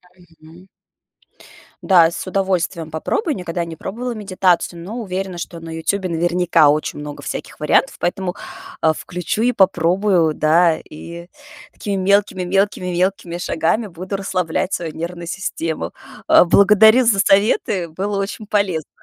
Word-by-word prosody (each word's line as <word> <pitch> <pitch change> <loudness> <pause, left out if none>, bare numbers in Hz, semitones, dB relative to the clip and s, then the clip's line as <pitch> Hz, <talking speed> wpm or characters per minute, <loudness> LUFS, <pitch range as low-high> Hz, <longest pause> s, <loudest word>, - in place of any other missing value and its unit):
Мгм. 170 0 -18 1.1
Да, 170 -4 +5
с - - -6
удовольствием 185 -3 -1
попробую. 290 - -2
Никогда 175 -2 -4
не 165 -1 -8
пробовала 240 +9 -5
медитацию, 185 -4 0
но 220 +7 -7
уверена 190 -3 -4
что 170 0 -7
на 165 0 -10
"Ютубе" 180 +4 -2
наверняка 170 -2 +3
очень 150 0 -1
много 145 0 -7
всяких - - -6
вариантов, - - +2
поэтому, 180 0 -2 0.5
а, 160 -1 +3
включу 180 +6 -4
и 250 - +3
попробую, 180 -3 +2
да, 160 +2 +3
и 170 +2 -10 0.5
такими 200 -1 -4
мелкими, 200 -1 +2
мелкими, 195 0 0
мелкими 180 -1 -1
шагами 190 +6 -1
буду 185 +2 -6
расслаблять 185 -2 -2
свою 165 -3 -3
нервную 170 +1 -6
систему. 165 -3 -4 0.4
А, - - +7
благодарю 220 +6 +6
за 210 -4 +3
советы, 195 -3 +2
было 195 +5 -3
очень 205 +2 -4
полезно. 190 -8 -1
180 Hz, 135 wpm, -19 LUFS, 165-195 Hz, 1.1 s, А